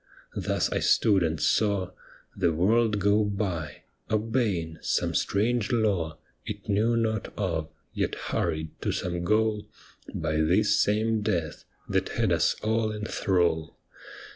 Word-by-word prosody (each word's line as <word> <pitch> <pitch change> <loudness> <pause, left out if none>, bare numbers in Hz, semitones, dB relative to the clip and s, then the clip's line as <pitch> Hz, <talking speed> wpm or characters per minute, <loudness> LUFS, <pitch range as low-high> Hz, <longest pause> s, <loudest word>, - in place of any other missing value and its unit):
Thus - - -1
I - - 0
stood 100 -4 +3
and 80 -2 0
saw 100 -4 +1 0.4
The 90 -4 +2
world 105 +6 +2
go 100 +2 +3
by, 95 -7 -3 0.3
obeying 105 -7 -1
some - - 0
strange 115 +3 +1
law 95 -10 0 0.3
It 105 0 -7
knew 110 +3 +2
not 110 -2 -1
of, 80 -6 -2 0.2
yet - - -1
hurried 80 0 -2
to - - 0
some 90 -1 -3
goal 110 +2 +1 0.4
By 80 0 -2
this 90 +7 +3
same 110 +1 +1
death, 85 -7 -2 0.2
that - - 0
had - - 0
us - - +2
all 110 0 +1
in 105 0 -5
thrall. 85 -7 0
100 Hz, 135 wpm, -27 LUFS, 85-110 Hz, 0.4 s, stood